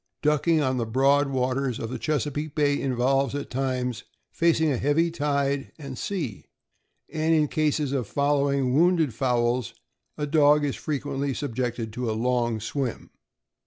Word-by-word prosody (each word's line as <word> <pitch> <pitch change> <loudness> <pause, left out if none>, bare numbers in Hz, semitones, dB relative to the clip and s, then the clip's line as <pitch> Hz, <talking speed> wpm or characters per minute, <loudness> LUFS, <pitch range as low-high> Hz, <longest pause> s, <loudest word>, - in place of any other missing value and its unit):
Ducking 150 +2 +3
on 130 -1 0
the 115 -2 -1
broad 140 +4 +3
waters 130 -1 -1
of 115 - -5
the - - -4
Chesapeake 150 -1 -2
Bay 145 -2 +2
involves, 135 +1 +1
at 145 - -5
times, 125 -2 -2 0.3
facing 160 -2 +2
a 130 - 0
heavy 150 +6 +2
tide 140 -3 -1
and 140 -4 -7
sea; 145 - -4 0.7
and 160 +1 +2
in 155 -1 +3
cases 150 -2 0
of 130 -6 -1
following 140 -2 +1
wounded 165 -3 +3
fowls, 120 -1 0 0.4
a 150 - -1
dog 150 0 +4
is 140 - -2
fre 155 - -4
quently 140 -1 -3
subjected 120 -4 -3
to 125 0 -3
a - - 0
long 120 -1 0
swim. 125 +3 -4
140 Hz, 155 wpm, -25 LUFS, 125-150 Hz, 0.7 s, dog